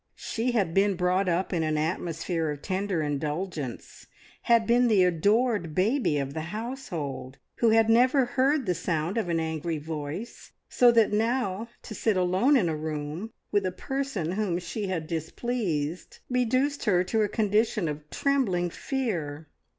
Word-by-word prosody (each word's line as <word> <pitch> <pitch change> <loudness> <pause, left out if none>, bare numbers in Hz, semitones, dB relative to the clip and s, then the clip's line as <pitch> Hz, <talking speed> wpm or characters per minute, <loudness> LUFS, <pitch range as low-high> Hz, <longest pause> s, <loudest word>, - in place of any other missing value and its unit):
She 235 +2 -2
had 195 -8 +1
been 195 +1 +3
brought 180 +1 +1
up 180 +3 0
in 170 - +1
an 155 -1 0
atmosphere 165 0 -1
of 145 -1 -5
tender 190 -3 -1
indulgence, 150 -1 -4 0.3
had 235 -1 +3
been 240 +2 +4
the 210 -5 +5
adored 195 0 +2
baby 215 - +2
of 140 -1 -2
the 160 - -3
household, 175 - -5 0.2
who 230 - +3
had 225 0 +4
never 250 +4 +4
heard 270 +3 +1
the 180 - +1
sound 165 +3 -1
of 185 - -2
an 165 -1 +1
angry 160 0 -2
voice, 155 +8 -6
so 245 -1 +5
that 225 -3 +3
now, 225 -1 0 0.2
to 220 - -8
sit 215 -1 +1
alone 185 +10 +3
in 195 -9 +2
a 160 - -1
room 155 +6 -4 0.2
with 205 -1 +2
a 185 - -1
person 225 - -3
whom 190 -3 -1
she 195 +4 -4
had 175 -4 -2
displeased, 165 -1 -3
reduced 255 +4 +1
her 180 -4 +3
to 220 +4 0
a 210 - +1
condition 210 -2 +1
of 150 0 -6
trembling 200 -12 0
fear. 165 - -3
185 Hz, 160 wpm, -27 LUFS, 160-230 Hz, 0.3 s, the